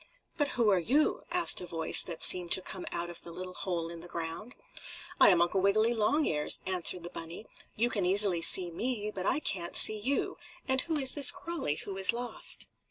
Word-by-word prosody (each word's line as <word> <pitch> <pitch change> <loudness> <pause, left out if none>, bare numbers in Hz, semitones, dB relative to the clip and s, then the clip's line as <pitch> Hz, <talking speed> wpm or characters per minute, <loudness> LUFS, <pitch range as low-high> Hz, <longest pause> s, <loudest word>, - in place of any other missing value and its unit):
"But 290 -4 -2
who 230 -3 +2
are 190 - +2
you?" 270 - 0
asked 355 0 +2
a 180 - -8
voice 165 -1 +5
that 170 -3 -6
seemed 180 -2 +1
to 190 - +2
come 185 - -6
out 175 0 -5
of 175 - -10
the 170 - -12
little 185 +2 -9
hole 175 -3 -4
in 170 - -8
the 170 - -11
ground. 170 +8 -7 0.6
"I - - +7
am 175 -3 +4
Uncle 185 +2 -1
Wiggily 215 +4 +2
Longears," 215 - 0
answered 180 -1 0
the 175 - -9
bunny. 165 +6 -9 0.3
"You 240 +3 0
can 200 - -2
easily 185 -1 +3
see 175 +1 +5
me, 215 +3 -4
but 185 0 -4
I - - +2
can't 175 - -2
see 215 0 +3
you. 270 +6 -3 0.3
And 265 -1 +1
who 320 -2 -4
is 265 -3 +2
this 285 -3 +6
Crawlie 325 - -5
who 195 -1 -7
is 195 +3 +2
lost?" 240 +1 -3
190 Hz, 210 wpm, -29 LUFS, 175-240 Hz, 0.6 s, I